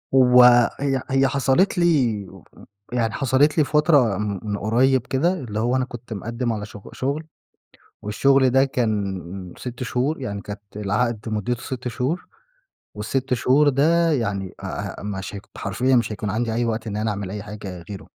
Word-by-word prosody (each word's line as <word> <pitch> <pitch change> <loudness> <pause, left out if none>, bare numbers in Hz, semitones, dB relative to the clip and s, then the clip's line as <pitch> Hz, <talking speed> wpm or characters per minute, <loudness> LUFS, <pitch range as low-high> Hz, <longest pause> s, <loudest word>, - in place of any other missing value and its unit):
هو– 125 -2 +7
هي– 135 -2 0
هي 135 0 +3
حصلت 140 +8 +2
لي 130 - +2 0.7
يعني 115 -3 0
حصلت 135 +5 +2
لي 155 - +5
فترة 145 - +3
م 105 -1 -2
من 105 -2 -2
قريب 125 +5 +2
كده، 165 +7 +1
اللي 120 - -4
هو 120 +3 +1
أنا 130 -1 +1
كنت 120 -2 -9
مقدم 115 +3 -3
على 105 -1 -4
شغ– 105 -1 -12
شغل، 140 +4 -2 0.8
والشغل 130 +5 +3
ده 135 +2 +4
كان 100 -8 -3
6 125 0 -7
شهور، 125 +5 -1
يعني 100 -6 -4
كانت 105 0 -8
العقد 110 +2 -1
مدته 110 +3 -2
6 125 -1 -5
شهور، 130 +9 -2 0.7
وال6 125 +5 -1
شهور 135 +5 +3
ده 160 +4 +3
يعني 100 -8 -2
أ - - -10 0.4
أ - - -9
مش 100 0 -5
ه 100 - -5 0.2
حرفيًا 125 +7 +1
مش 115 -2 +1
هيكون 105 0 -4
عندي 115 +3 -1
أي 120 +1 0
وقت 115 0 -2
إن 105 - -3
أنا 110 +1 -1
أعمل 100 -2 -4
أي 105 +1 -5
حاجة 100 -4 -8
غيره. 100 - -8
120 Hz, 170 wpm, -22 LUFS, 105-135 Hz, 0.8 s, هو